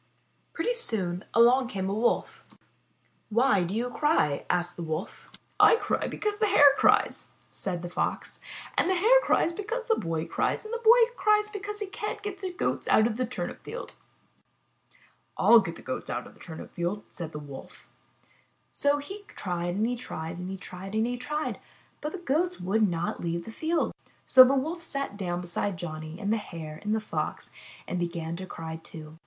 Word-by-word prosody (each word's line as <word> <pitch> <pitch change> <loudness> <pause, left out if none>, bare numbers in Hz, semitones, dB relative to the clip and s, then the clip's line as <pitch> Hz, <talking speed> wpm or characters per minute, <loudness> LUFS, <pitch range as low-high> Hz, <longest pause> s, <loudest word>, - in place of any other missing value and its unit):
Pretty 340 +9 0
soon 195 - -1
along 245 +2 +5
came 190 -5 -3
a 195 - -1
Wolf. 225 +3 0 0.9
'Why 220 -3 +3
do 180 +4 -3
you 245 +2 -1
cry?'' 295 - +1
asked 175 0 0
the - - -7
Wolf. 160 +2 -5 0.3
'*I - - +8
cry - - -1
because 420 0 -2
the 430 - +3
Hare 290 -8 +7
cries/' - - +3 0.2
said 180 -3 -3
the - - -3
Fox, 175 - -3 0.3
''and 345 - +2
the 375 - +3
Hare 455 +8 +6
cries 340 - +2
because 455 +6 -4
the 450 - +4
Boy 165 -3 -2
cries, - - -1
and 435 - -6
the 470 - -1
Boy 470 +1 +6
cries 425 -1 +3
because 415 0 -6
he - - 0
can't 410 +2 -5
get 405 -1 -5
the 375 -2 -3
Goats 355 - -2
out 215 - +5
of 230 -2 0
the 255 -1 0
turnip 255 - -5
field." - - -7 1.4
"/'// 230 -3 +7
get 170 -3 -5
the - - -13
Goats 130 - -4
out 120 +1 -3
of - - -13
the - - -22
turnip 160 -2 -9
field," 175 +4 -2
said 165 -3 -6
the 150 - -6
Wolf. 145 -2 -10 0.8
So 285 0 +2
he 390 +9 -7
tried 175 -1 -2
and 210 +3 +1
he 245 +1 0
tried 170 -7 -6
and 180 +1 -5
he 195 - -4
tried 190 +2 -8
and 220 +1 +2
he 245 +1 -1
tried, 300 +5 -3 0.4
but 300 - -3
the 385 - -5
Goats 350 +2 0
would 205 +3 +2
not 170 0 -2
leave 170 0 -2
the 225 - -7
field. 325 +7 0 0.3
So 260 - +10
the 265 +2 +3
Wolf 320 +6 -1
sat 275 -8 -3
down 180 -3 -2
beside 180 +2 -2
Johnny 155 0 -6
and 210 0 0
the - - +2
Hare 160 -6 -7
and 210 +1 0
the - - +1
Fox 215 - -4 0.4
and 180 - -2
began 170 -1 -3
to 185 +1 -6
cry, 160 -2 -6
too. 160 -1 -11
220 Hz, 195 wpm, -28 LUFS, -, 1.4 s, So